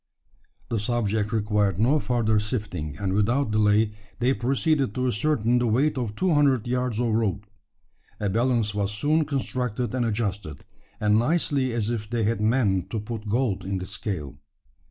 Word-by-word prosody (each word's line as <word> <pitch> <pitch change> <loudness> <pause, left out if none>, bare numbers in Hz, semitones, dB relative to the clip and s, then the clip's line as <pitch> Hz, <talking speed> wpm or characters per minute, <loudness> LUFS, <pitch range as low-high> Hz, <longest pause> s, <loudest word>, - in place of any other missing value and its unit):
The 115 - 0
subject 105 -1 -1
required 105 -3 +1
no 130 +9 +3
further 115 -5 +1
sifting; 105 - -4
and 95 -2 -2
without 115 +5 +1
delay 105 0 +3 0.3
they 125 +3 +2
proceeded 135 -1 0
to 130 - 0
ascertain 125 0 +1
the 120 - +1
weight 135 +7 +2
of 120 -5 -3
two 185 +4 +1
hundred 135 -5 +3
yards 125 -2 -1
of 120 -1 +1
rope. 110 -2 0 0.7
A 105 - -1
balance 115 0 +1
was 100 -1 -1
soon 150 +9 +1
constructed 125 -5 -2
and 130 -1 0
adjusted, 105 -9 -3 0.3
as 105 0 +1
nicely 130 +2 +2
as 115 -1 -1
if 110 -3 -4
they 120 -1 0
had 110 +1 0
meant 105 -5 +1
to 110 - -2
put 110 0 -6
gold 115 -3 0
in 95 0 -2
the 90 - -5
scale. 90 -9 -4
110 Hz, 165 wpm, -25 LUFS, 105-125 Hz, 0.7 s, no